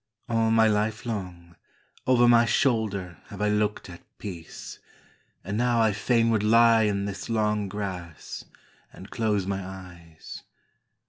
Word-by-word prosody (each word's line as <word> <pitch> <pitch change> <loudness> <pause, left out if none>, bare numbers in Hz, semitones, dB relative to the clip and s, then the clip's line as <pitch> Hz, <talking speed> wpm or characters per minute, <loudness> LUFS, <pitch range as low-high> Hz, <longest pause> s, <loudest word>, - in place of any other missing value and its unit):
All 115 -1 +1
my 110 0 +4
life 105 0 0
long 90 -6 -6 0.5
Over 120 -1 +5
my 120 0 +6
shoulder 105 - 0
have 100 - -10
I 105 0 +1
looked 105 0 0
at 85 -1 -11 0.2
peace; 85 -6 -9 0.6
And 100 +4 -3
now 120 -1 +2
I 110 -2 +3
fain 115 +2 +2
would 110 -2 +2
lie 115 +1 +5
in 100 -1 0
this 100 +2 -6
long 105 -2 0
grass 90 -6 -6 0.5
And 95 - -13
close 105 -4 0
my 95 0 -3
eyes. 90 -4 -11
105 Hz, 140 wpm, -26 LUFS, 95-115 Hz, 0.6 s, my